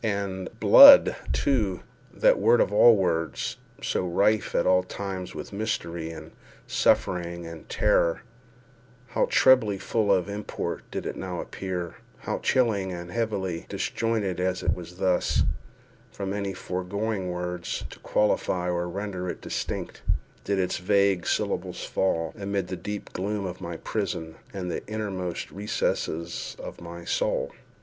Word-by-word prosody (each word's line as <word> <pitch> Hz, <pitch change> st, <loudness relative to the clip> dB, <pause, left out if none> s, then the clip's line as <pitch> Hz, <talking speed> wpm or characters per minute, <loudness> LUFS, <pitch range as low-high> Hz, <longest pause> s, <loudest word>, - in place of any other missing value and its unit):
And 100 Hz, -3 st, -2 dB
"blood," -, -, +10 dB, 0.2 s
too, 105 Hz, -10 st, +1 dB, 0.3 s
that -, -, +3 dB
word 115 Hz, +4 st, +5 dB
of -, -, +2 dB
all 115 Hz, +2 st, +8 dB
words—so 85 Hz, -1 st, -2 dB
rife 100 Hz, +4 st, +1 dB
at -, -, +2 dB
all 90 Hz, 0 st, +5 dB
times 95 Hz, 0 st, -6 dB
with -, -, -7 dB
mystery, 85 Hz, -6 st, -3 dB
and 80 Hz, -, -9 dB, 0.3 s
suffering, 85 Hz, -1 st, +1 dB
and 85 Hz, -2 st, -10 dB
terror—how 125 Hz, +5 st, -2 dB
trebly 120 Hz, -7 st, +5 dB
full 100 Hz, +2 st, 0 dB
of 95 Hz, -1 st, +2 dB
import 105 Hz, +1 st, -5 dB
did -, -, -5 dB
it -, -, -3 dB
now 90 Hz, -2 st, -5 dB
appear—how 90 Hz, -3 st, -5 dB
chilly 110 Hz, -7 st, +1 dB
and 90 Hz, -1 st, -6 dB
heavily 95 Hz, -5 st, -2 dB
(disjointed, 110 Hz, -6 st, -1 dB
as 95 Hz, 0 st, -1 dB
it -, -, +2 dB
thus 90 Hz, -1 st, -10 dB
was, 90 Hz, -1 st, +2 dB, 0.7 s
from 100 Hz, -1 st, -4 dB
any 100 Hz, -2 st, -3 dB
foregoing 95 Hz, +2 st, -3 dB
words 90 Hz, 0 st, -3 dB
to -, -, -12 dB
qualify 90 Hz, -4 st, +1 dB
or 90 Hz, 0 st, -1 dB
render 95 Hz, -1 st, -4 dB
it -, -, -5 dB
distinct) -, -, -4 dB, 0.4 s
did 100 Hz, 0 st, 0 dB
its 95 Hz, -1 st, 0 dB
vague 100 Hz, -1 st, +2 dB
syllables -, -, -1 dB
fall, 80 Hz, -4 st, 0 dB
amid 100 Hz, -2 st, -2 dB
the 95 Hz, -, -3 dB
deep 105 Hz, +2 st, -6 dB
gloom 100 Hz, +2 st, -2 dB
of 90 Hz, 0 st, -6 dB
my 85 Hz, -2 st, -5 dB
prison, 85 Hz, -5 st, -3 dB, 0.2 s
into 95 Hz, -2 st, -4 dB
the -, -, -4 dB
innermost 100 Hz, -5 st, -4 dB
recesses 85 Hz, -4 st, -2 dB
of -, -, -9 dB
my 85 Hz, 0 st, -9 dB
soul! -, -, 0 dB
95 Hz, 135 wpm, -26 LUFS, 90-105 Hz, 0.7 s, blood